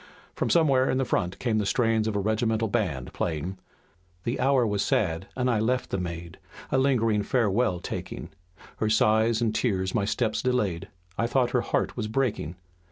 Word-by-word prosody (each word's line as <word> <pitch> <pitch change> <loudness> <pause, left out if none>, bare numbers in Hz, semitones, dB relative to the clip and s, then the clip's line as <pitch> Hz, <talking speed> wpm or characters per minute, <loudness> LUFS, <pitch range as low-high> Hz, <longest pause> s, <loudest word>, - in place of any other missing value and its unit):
From - - -1
somewhere 140 -6 +4
in 130 0 +1
front 90 -4 -1
came 115 -3 0
the 105 - 0
strains 115 -2 +2
of 110 - -2
a - - +1
regimental 110 +2 +1
band 90 - -2
playing: 85 +4 -3 0.6
"The 120 - -2
hour 135 -2 +3
was 105 -2 0
sad, 90 -2 0
I 125 -3 +1
left 125 +3 0
the 100 - 0
maid, 85 -1 -6 0.3
A 135 - +3
lingering 115 -6 +2
farewell 105 -4 +1
taking, - - -6 0.5
Her 110 - 0
sighs 110 +1 +3
and 110 -2 +1
tears 95 -6 0
my 105 -4 +1
steps 110 +1 0
delayed, 105 -10 0 0.3
I 115 - +2
thought 125 0 +1
her 125 - +2
heart - - -1
was 115 -3 -2
breaking. 110 - -1
110 Hz, 170 wpm, -27 LUFS, 100-125 Hz, 0.6 s, somewhere